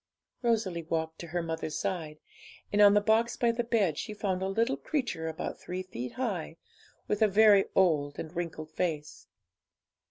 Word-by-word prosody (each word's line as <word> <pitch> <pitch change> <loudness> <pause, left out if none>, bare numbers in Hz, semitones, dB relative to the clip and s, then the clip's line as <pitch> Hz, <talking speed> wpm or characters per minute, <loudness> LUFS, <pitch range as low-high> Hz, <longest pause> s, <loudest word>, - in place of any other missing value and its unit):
Rosalie 220 -8 0
walked 160 0 -3
to 170 - -7
her 175 +1 -2
mother's 160 -1 -3
side, 160 -5 -3 0.6
and 205 - +4
on 205 0 +8
the 205 - +5
box 225 +3 +2
by 235 -1 +3
the 235 +1 -1
bed 210 -10 +1
she 210 - -5
found 190 -3 -1
a 190 - 0
little 230 +7 +1
creature 245 - -2
about 160 -1 -5
three 185 +1 -5
feet 125 -9 -6
high, 190 -10 -3 0.5
with 210 +1 -1
a 215 - +6
very 205 -1 +6
old 150 -6 +2
and 160 +2 -7
wrinkled 160 -2 -4
face. 155 -4 -3
185 Hz, 170 wpm, -30 LUFS, 160-215 Hz, 0.6 s, on